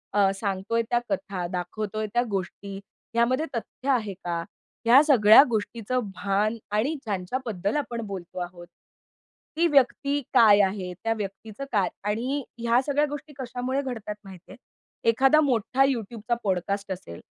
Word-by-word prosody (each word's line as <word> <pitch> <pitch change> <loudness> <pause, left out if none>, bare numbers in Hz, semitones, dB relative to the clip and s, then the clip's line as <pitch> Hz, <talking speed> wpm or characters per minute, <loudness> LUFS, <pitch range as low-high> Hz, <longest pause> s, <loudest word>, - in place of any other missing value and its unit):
अ, 200 -1 +5
सांगतोय 200 +3 -1
त्या 240 - +2
कथा, 195 -11 -2
दाखवतोय 205 +4 -3
त्या 240 - +3
गोष्टी 195 +1 -4 0.4
ह्यामध्ये 245 +6 +2
तथ्य 255 +3 -5
आहे 220 -6 +1
का, 175 -2 -4 0.5
ह्या 245 +4 +8
सगळ्या 225 -8 +8
गोष्टीचं 230 +2 -1 0.2
भान 205 +4 0 0.2
आणि 255 +9 +1
ज्यांच्याबद्दल 205 0 -2
आपण 240 -5 -3
बोलतो 185 -2 -7
आहोत, 175 -1 -7 0.9
ती 335 - +3
व्यक्ती 280 0 +2
काय 220 -5 +7
आहे? 190 -2 -1
त्या 225 - +1
व्यक्तीचं 210 +5 -6
काय 200 -5 +2 0.2
आणि 260 +6 -2 0.2
ह्या 235 +2 +3
सगळ्या 290 +1 +2
गोष्टी 295 +1 -7
कशामुळे 255 +2 -2
घडतात 225 -6 -5
माहितीये, 190 +1 -13 0.5
एखादा 270 +6 +5
मोठा 260 -1 +2
YouTubeचा 235 -2 -2
पॉडकास्ट 195 +1 -1
असेल, 175 - -7
220 Hz, 135 wpm, -26 LUFS, 195-255 Hz, 0.9 s, ह्या